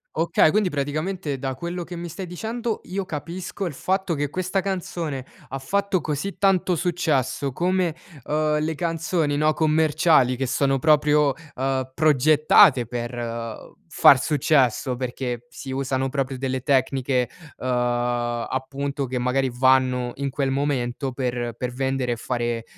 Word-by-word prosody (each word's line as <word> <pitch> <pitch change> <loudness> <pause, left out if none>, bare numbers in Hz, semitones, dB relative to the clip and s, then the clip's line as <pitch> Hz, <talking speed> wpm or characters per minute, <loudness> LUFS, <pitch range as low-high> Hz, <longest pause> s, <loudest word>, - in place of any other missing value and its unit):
Okay. 165 -1 +3
Quindi, 205 +1 +2
praticamente 150 +1 -2
da 135 0 -3
quello 170 +6 -5
che 175 +2 -8
mi 170 0 -6
stai 185 +4 -6
dicendo, 225 +6 -4
io 190 +1 -3
capisco 175 +6 -5
il 170 - -3
fatto 190 +3 -1
che 145 -1 -1
questa 185 +1 -1
canzone 170 -7 -3 0.3
ha 135 - -4
fatto 200 +6 0
così 155 +6 -3
tanto 190 -2 +3
successo 150 -6 0
come, 180 +1 0 0.3
uhm, 150 0 +1
le 155 +1 -1
canzoni, 165 -2 -1
no, 155 +1 +3
commerciali 155 -4 +3
che 135 +1 -2
sono 135 +1 +1
proprio, 150 -1 +4 0.2
uhm, 130 0 -1
progettate 150 - +5
per, 120 0 -4
uhm, 115 -1 -6
far 135 - +6
successo 135 -3 +2
perché 125 -1 -4
si 135 +2 -8
usano 135 0 -1
proprio 135 -1 -2
delle 130 -1 -2
tecniche, 130 -2 +1 0.3
uhm, 130 - -5 0.8
appunto 140 +1 -3
che 125 0 -3
magari 130 +1 0
vanno 125 -1 +3
in 140 0 -2
quel 135 -1 -1
momento, 135 -1 -1
per 120 -2 -2
per 125 +1 -3
vendere 130 -1 -1
e - - -3
fare 120 -1 -2
140 Hz, 145 wpm, -23 LUFS, 130-165 Hz, 0.8 s, far